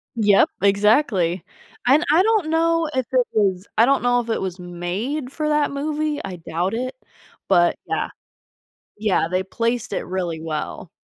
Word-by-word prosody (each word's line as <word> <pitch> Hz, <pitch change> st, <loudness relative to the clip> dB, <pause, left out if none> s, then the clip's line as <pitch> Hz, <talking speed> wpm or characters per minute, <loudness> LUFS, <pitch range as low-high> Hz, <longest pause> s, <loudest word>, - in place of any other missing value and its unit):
Yep, 210 Hz, -3 st, +4 dB
exactly, 200 Hz, -, +2 dB, 0.4 s
and 280 Hz, +6 st, +5 dB
I 335 Hz, +5 st, +5 dB
don't 435 Hz, -5 st, +2 dB
know 330 Hz, 0 st, +2 dB
if 260 Hz, -1 st, 0 dB
it 255 Hz, -2 st, +2 dB
was 195 Hz, -3 st, +1 dB
I 225 Hz, -, +6 dB
don't 275 Hz, +2 st, +2 dB
know 245 Hz, 0 st, +3 dB
if 235 Hz, -1 st, -5 dB
it 225 Hz, -, -1 dB
was 185 Hz, -1 st, -4 dB
made 185 Hz, -, -4 dB
for 305 Hz, +1 st, -2 dB
that 300 Hz, -1 st, +2 dB
movie- 300 Hz, +1 st, -2 dB
I 185 Hz, -2 st, -6 dB
doubt 175 Hz, +3 st, -2 dB
it- 255 Hz, +3 st, -3 dB, 0.5 s
but, 175 Hz, 0 st, +4 dB
yeah -, -, -1 dB, 0.9 s
Yeah, 205 Hz, -6 st, +1 dB
they 185 Hz, +1 st, 0 dB
placed 230 Hz, +4 st, -2 dB
it -, -, -2 dB
really 175 Hz, -3 st, -3 dB
well. 160 Hz, -1 st, -5 dB
225 Hz, 165 wpm, -22 LUFS, 185-285 Hz, 0.9 s, I